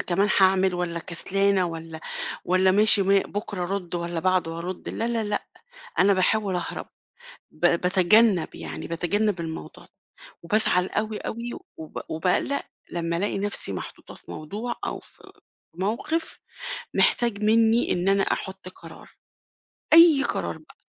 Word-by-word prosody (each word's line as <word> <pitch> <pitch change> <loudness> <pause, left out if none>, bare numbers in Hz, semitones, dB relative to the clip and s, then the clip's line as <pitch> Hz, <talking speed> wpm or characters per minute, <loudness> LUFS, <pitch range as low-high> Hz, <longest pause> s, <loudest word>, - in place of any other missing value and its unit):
كمان 195 +4 +1
هاعمل 190 -1 +4
والّا 175 -1 -2
كسلانة 190 +3 0
والّا 165 -1 -7 0.4
والّا 185 +1 +3
ماشي 210 +1 +6
ما 195 +1 +4
بكرة 200 -1 -4
أرُد 180 -1 -4
والّا 170 -1 -3
بعده 180 -3 0
أرُد، 180 +2 -6
لا، 230 - -2
لا، 230 -2 -1
لأ، 210 0 -2 0.5
أنا 200 +1 +5
باحاول 190 0 +1
أهرب. 175 - -4 0.7
ب - - -22 0.2
باتجنَّب، 190 +1 +4
يعني - - -7
باتجنَّب 180 +4 0
الموضوع 160 -1 -7
د - - -24 0.5
وبازعل 180 -1 +3
أوي، 215 0 -2
أوي 235 +1 -5 0.2
وب 160 -1 -7
وباقلّق 180 - 0 0.3
لمّا 170 -1 -2
ألاقي 200 +2 -1
نَفْسي 200 - -2
محطوطة - - -8
في - - -13
موضوع 210 - -5
أو - - -4
في - - -15 0.4
موقِف 240 - -2 0.6
محتاج 230 -4 +2
منّي 225 +2 +3
إن 180 +2 0
أنا 195 0 +3
أحُط 190 -1 -3
قرار، 185 - -13 0.8
أي 325 -4 +8
قرار - - -2
بقى. - - -19
190 Hz, 140 wpm, -25 LUFS, 175-215 Hz, 0.8 s, أي